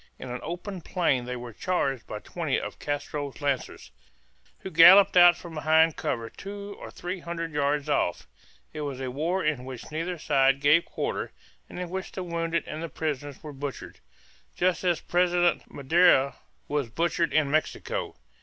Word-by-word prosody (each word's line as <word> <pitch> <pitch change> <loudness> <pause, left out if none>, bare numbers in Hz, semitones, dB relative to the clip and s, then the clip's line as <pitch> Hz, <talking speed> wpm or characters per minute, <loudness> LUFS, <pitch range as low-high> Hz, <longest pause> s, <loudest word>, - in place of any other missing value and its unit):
In - - -8
an 125 - -4
open 180 +3 -6
plain 150 -9 0
they 125 0 -4
were 120 -1 -8
charged 135 - -1
by 105 - -5
twenty 155 +5 -2
of - - -7
Castro's 145 -1 -4
lancers, 140 -3 -3 0.7
who 190 - -7
galloped 185 +4 +8
out 175 -1 +8
from 170 -2 -10
behind 160 +1 +3
cover 115 -3 -2
two 200 - -8
or - - -8
three 180 +2 -5
hundred 165 -1 -5
yards 145 0 0
off. 115 -11 0 0.5
It 155 - -5
was 140 -3 -4
a 130 -1 -4
war 165 +7 -1
in 150 -5 0
which 130 +2 -9
neither 165 +3 -3
side 135 -2 +3
gave 150 +4 +4
quarter - - -3 0.4
and - - -8
in 180 -1 -5
which 190 0 -5
the 185 - -4
wounded 170 -1 -1
and 155 - -6
the 165 - -4
prisoners 145 -3 -4
were 150 -2 -7
butchered 140 0 -7 0.6
just 180 +1 +1
as 175 -2 +1
President 175 0 +1
Madero 140 -1 +4 0.3
was 145 -5 -1
butchered 170 +5 0
in 150 -3 +2
Mexico. 485 - -2
155 Hz, 170 wpm, -27 LUFS, 140-175 Hz, 0.7 s, galloped